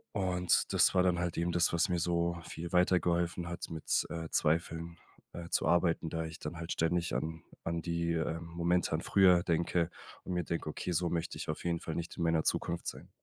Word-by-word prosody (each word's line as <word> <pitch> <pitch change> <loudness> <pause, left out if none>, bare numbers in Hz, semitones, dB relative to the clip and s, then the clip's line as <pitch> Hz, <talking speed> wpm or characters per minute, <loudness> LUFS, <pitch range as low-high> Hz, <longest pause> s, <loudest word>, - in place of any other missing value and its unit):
Und 90 -2 +2
das - - +5
war 90 - +5
dann 90 -1 +2
halt 85 -1 -2
eben 85 +1 0
das, 85 0 +3
was 85 - +2
mir 90 -1 +1
so 85 0 0
viel 85 +1 -7
weitergeholfen 85 -1 +2
hat 85 0 -5
mit, 80 -2 0
äh, 80 -1 -5
Zweifeln, 85 +1 0 0.4
äh, 85 -1 -7
zu - - +1
arbeiten, 85 -1 +2
da 80 +1 -2
ich 80 0 -8
dann 75 +3 -6
halt 85 +1 -5
ständig 85 +1 0
an 80 0 -3 0.2
an 85 0 -2
die, 85 0 -1
äh, 80 0 -1
Momente 85 +1 0
an 80 - 0
früher 90 -3 +5
denke 85 0 +1 0.3
und 90 - -4
mir 90 -1 0
denke: 85 -1 -3
„Okay, 90 - -4
so 85 +1 +1
möchte 85 -1 -2
ich - - -6
auf 75 - -3
jeden 85 -1 0
Fall 80 - -5
nicht 85 0 -4
in 85 - -1
meiner 80 -1 +2
Zukunft 85 0 -1
sein.“ - - -6
85 Hz, 215 wpm, -32 LUFS, 80-85 Hz, 0.4 s, das